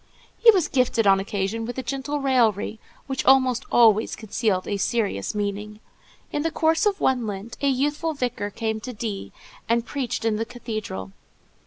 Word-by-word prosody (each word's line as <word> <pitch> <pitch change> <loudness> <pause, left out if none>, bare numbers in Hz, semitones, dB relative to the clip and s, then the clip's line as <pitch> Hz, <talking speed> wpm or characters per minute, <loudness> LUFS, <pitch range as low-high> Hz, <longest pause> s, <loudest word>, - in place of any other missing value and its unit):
He 470 - +7
was 375 -8 +5
gifted, 250 -4 +1
on 195 -1 +5
occasion, 200 +3 -2
with 245 +3 -5
a 260 - -2
gentle 275 +4 -3
raillery, 225 -5 +1 0.3
which 265 -1 -2
almost 260 -2 +4
always 220 -2 +4
concealed 215 -3 -1
a 205 - -1
serious 205 - -1
meaning. 210 +1 -3 0.5
In 295 - -1
the 330 - 0
course 320 +5 +2
of 405 -1 0
one 250 -4 +1
Lent, 205 +3 -6
a 280 - +2
youthful 295 +4 0
vicar 245 -6 -2
came 220 +1 -3
to 250 +3 -7
D——, 210 -3 -5 0.4
and 230 0 +2
preached 250 -2 -3
in 220 -2 +1
the 225 - -1
cathedral. 215 - -6
230 Hz, 170 wpm, -24 LUFS, 210-265 Hz, 0.5 s, He